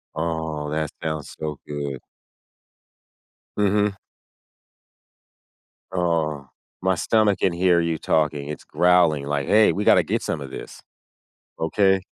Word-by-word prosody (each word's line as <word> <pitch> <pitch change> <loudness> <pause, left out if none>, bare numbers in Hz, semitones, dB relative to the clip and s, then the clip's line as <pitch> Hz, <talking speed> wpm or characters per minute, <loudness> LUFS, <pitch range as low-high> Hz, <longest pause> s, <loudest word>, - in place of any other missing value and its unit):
Oh, 80 -2 -3
that 80 -1 -1
sounds 80 -2 -4
so 75 -2 -4
good. 70 -3 -4 1.6
Mhm. 105 0 +2 2.0
Oh, 80 -6 -1 0.3
my 95 +1 +2
stomach 105 0 +2
can 95 - +2
hear 90 0 +3
you 85 -1 -1
talking. 75 -2 0
It's 75 - -6
growling 85 -5 +3
like, 70 -1 -2
"Hey, 105 +1 +5
we 105 - -2
gotta - - +5
get - - -1
some 80 - -3
of 70 - -7
this. - - -9 0.8
Okay?" 95 +3 +2
80 Hz, 120 wpm, -23 LUFS, 75-95 Hz, 2.0 s, Hey